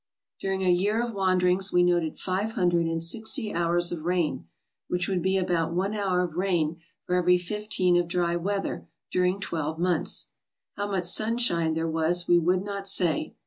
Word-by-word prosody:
During 190 0 -2
a 185 - +3
year 200 +5 +1
of 240 -1 -2
wanderings 185 0 +2
we 180 0 +4
noted 175 -3 +1
five 195 +4 -2
hundred 175 -3 +1
and 165 0 -2
sixty 220 +5 0
hours 175 0 +1
of 165 -3 -5
rain, 165 - -1 0.4
which 180 0 -1
would 185 -3 -1
be 190 +2 +1
about 170 -3 0
one 195 +3 0
hour 195 -4 0
of 175 -3 -3
rain 170 -3 -1 0.2
for 180 - -2
every 180 0 +4
fifteen 185 -1 0
of 175 -1 +1
dry 175 -1 0
weather 195 +3 -3 0.2
during 180 +1 +1
twelve 160 -4 -3
months. 175 -1 0 0.5
How 205 - -3
much 190 -3 -2
sunshine 180 -5 +1
there 160 0 -1
was 165 +2 0
we 175 0 +5
would 180 +3 +1
not 200 -1 -5
say. 175 -5 0
180 Hz, 180 wpm, -26 LUFS, 170-195 Hz, 0.5 s, we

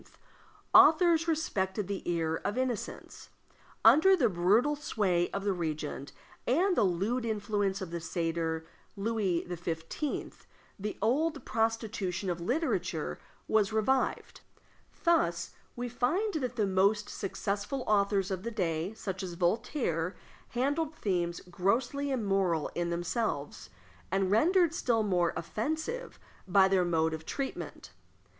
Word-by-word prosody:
authors 330 +1 +6
respected 205 - -1
the 200 -1 -3
ear 165 -2 0
of 205 - -2
innocence; 255 -4 -4 0.6
under 380 +6 +7
the 275 -10 +3
brutal 210 +10 +3
sway 195 -12 0
of 200 - -4
the 200 -1 +1
regent, 155 -4 -4 0.4
and 355 +9 +3
the - - +3
lewd 200 +7 0
influence 205 -3 -1
of 185 -3 -5
the 170 - -3
satyr 165 -1 -2 0.3
Louis 200 -4 0
XV., 175 - -4 0.3
the 210 +1 -4
old 290 +5 +1
prostitution 220 -5 -1
of 170 0 -4
literature 280 - -1 0.3
was 215 -2 +2
revived. 220 +5 0 0.6
Thus 175 - +2 0.2
we 245 0 -3
find 320 - 0
that 255 -6 -2
the 215 -4 +1
most 200 +2 +2
successful 205 +6 -3
authors 200 -2 +2
of 185 -1 -2
the 230 - -3
day, 180 -2 -2
such 190 -3 -4
as 180 -2 -5
Voltaire, 180 - 0 0.3
handled 290 +5 -1
themes 175 - -1
grossly 230 +10 0
immoral 195 - 0
in 175 0 -1
themselves, 170 - -2 0.4
and 190 0 +1
rendered 335 - +4
still 235 -9 +1
more 180 -4 +2
offensive 315 - -3 0.3
by 190 +1 +5
their 190 -2 +3
mode 160 -2 +1
of 160 0 -5
treatment. 275 - -5
205 Hz, 125 wpm, -30 LUFS, 175-255 Hz, 0.6 s, under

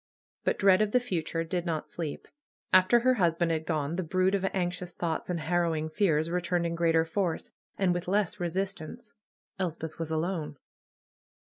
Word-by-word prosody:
But - - +1
dread 195 0 +5
of 210 -1 +1
the 250 - +6
future 165 -8 -2
did 175 +1 -2
not 165 -3 -2
sleep. 160 -4 -5 0.5
After 185 +6 +6
her 255 +1 +4
husband 170 -5 +2
had 160 -1 -2
gone 155 0 -1
the - - +1
brood 185 +3 +1
of 195 -1 +1
anxious 180 -2 -2
thoughts 165 0 -2
and 170 -2 -1
harrowing 160 -1 0
fears 160 -3 +2
returned 175 0 0
in 170 - -1
greater 165 -1 +3
force, 170 0 -2 0.3
and 185 -3 +2
with 175 0 -3
less 200 -1 +1
resistance. 190 +4 -4 0.5
Elspeth 165 -3 -3
was 165 -1 -3
alone. 160 -2 -2
175 Hz, 165 wpm, -29 LUFS, 160-185 Hz, 0.5 s, the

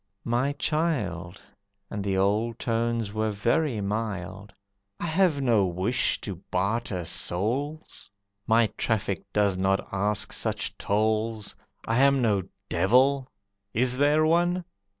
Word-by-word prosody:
"My 125 +4 +1
child," 110 - -1 0.5
And 100 -1 -3
the 95 -1 0
old 105 +4 +1
tones 115 -2 -1
were 110 0 0
very 115 +4 0
mild, 100 -1 -4 0.5
"I - - -3
have 165 -3 +2
no 115 -6 +4
wish 95 +8 0
to 100 -4 -5
barter 95 -1 -1
souls; 130 - -2 0.4
My 115 +1 +5
traffic 100 -5 0
does 100 -3 +2
not 95 +1 +1
ask 100 +2 0
such - - -2
tolls. 110 +1 0 0.3
I 115 +2 +2
am 140 0 +5
no 105 -5 +2 0.3
devil; 130 +5 +3 0.5
is 125 +2 +3
there 145 +3 +3
one? 175 +2 +2
110 Hz, 120 wpm, -26 LUFS, 100-135 Hz, 0.5 s, My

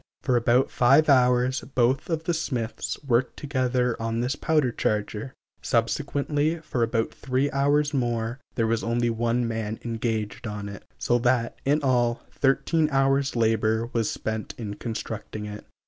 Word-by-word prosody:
For 125 - +2
about 120 +2 +3
five 140 +5 +4
hours 125 -1 +4
both 130 +4 +2
of 160 -1 -1
the 175 +1 0
smiths 125 -8 -3
worked 125 -2 +1
together 125 -4 0
on 115 0 -1
this 125 +4 0
powder 150 -6 +1
charger; 110 +3 -2 0.3
subsequently, 145 +6 0
for 155 -6 -3
about 115 -1 0
three 135 +2 -1
hours' 145 +2 +2
more, 120 -1 -1 0.2
there 115 - +1
was 115 0 0
only 120 0 +1
one 115 +1 0
man 110 -1 -3
engaged 115 -1 -2
on 105 -1 -5
it; 100 - -10
so 120 0 +1
that, 120 -1 +1
in 145 +2 +2
all, 120 -3 +1
thirteen 150 +3 +2
hours 135 -1 +2
labor 110 0 +1
was 115 -3 +1
spent 110 -1 -4
in 105 -4 -5
constructing 110 -1 -5
it. 105 0 -8
120 Hz, 150 wpm, -26 LUFS, 115-135 Hz, 0.3 s, five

